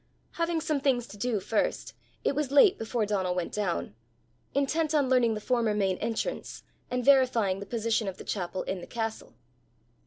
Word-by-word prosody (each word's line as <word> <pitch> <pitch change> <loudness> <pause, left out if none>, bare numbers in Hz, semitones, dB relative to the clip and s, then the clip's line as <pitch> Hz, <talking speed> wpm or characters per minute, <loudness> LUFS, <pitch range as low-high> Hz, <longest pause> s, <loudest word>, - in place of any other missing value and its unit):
Having 335 -1 -1
some 305 -2 0
things 260 -4 +1
to 210 - -12
do 215 +1 -1
first, 215 +3 -1 0.3
it - - +2
was 290 -1 -1
late 290 +8 +6
before 225 0 -1
Donal 190 -3 0
went 180 -2 -2
down 195 - -2 0.6
intent 305 +3 +1
on 285 -3 +3
learning 240 -4 +3
the - - -3
former 230 -1 +1
main 195 -3 0
entrance, 230 - -3 0.3
and 250 -1 -2
verifying 245 -8 +4
the 200 - -8
position 225 -2 0
of 190 - -4
the - - -9
chapel 185 -1 -3
in 190 -1 -4
the - - -9
castle. 225 -1 -4
230 Hz, 180 wpm, -28 LUFS, 205-275 Hz, 0.6 s, late